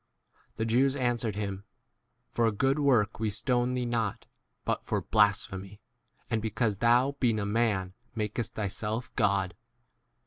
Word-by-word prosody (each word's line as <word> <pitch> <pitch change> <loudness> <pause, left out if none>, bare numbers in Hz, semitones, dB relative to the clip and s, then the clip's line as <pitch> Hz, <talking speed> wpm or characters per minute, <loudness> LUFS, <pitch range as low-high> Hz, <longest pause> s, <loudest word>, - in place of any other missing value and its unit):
The 110 - -1
Jews 130 +4 +3
an 120 -3 +1
swered 110 -4 -2
hiny 100 -2 -3 0.7
For 115 -1 +2
a - - +2
good 135 +7 +1
work 120 -8 +2
we 110 -1 0
stone 125 +4 +1
thee 125 -1 -1
not, 115 -4 -1 0.4
but - - -1
for - - -1
blasphemy, 100 -2 +1 0.5
and 110 -1 0
because 110 -1 0
thou,* 120 +5 +4
being 115 -4 +2
a 100 - -1
man, 105 -3 +1 0.3
34 - - -13
makest 110 +1 -2
thyself 110 +4 -3
God. 95 -3 +1
110 Hz, 150 wpm, -29 LUFS, 100-120 Hz, 0.7 s, thou